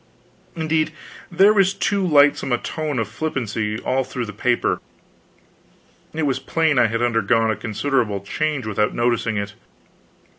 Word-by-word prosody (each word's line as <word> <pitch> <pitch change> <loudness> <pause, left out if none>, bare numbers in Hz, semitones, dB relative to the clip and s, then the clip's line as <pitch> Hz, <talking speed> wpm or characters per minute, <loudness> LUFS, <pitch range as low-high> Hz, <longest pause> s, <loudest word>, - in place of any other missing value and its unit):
Indeed, 160 -1 0 0.4
there 195 +5 +5
was 195 -2 +3
too 200 0 0
lightsome 145 -5 +4
a 120 - +3
tone 155 -1 -4
of 115 -3 -1
flippancy 115 -4 -3
all 130 +3 0
through 125 -1 -4
the 105 - -8
paper. 120 +4 0 1.3
It 160 0 -3
was 135 -2 0
plain 160 -5 +1
I 120 - +5
had 115 +2 -1
undergone 115 -1 +2
a - - -1
considerable 110 -1 -1
change 145 +6 -2
without 105 0 0
noticing 120 -2 0
it. 100 0 -3
125 Hz, 145 wpm, -21 LUFS, 110-155 Hz, 1.3 s, there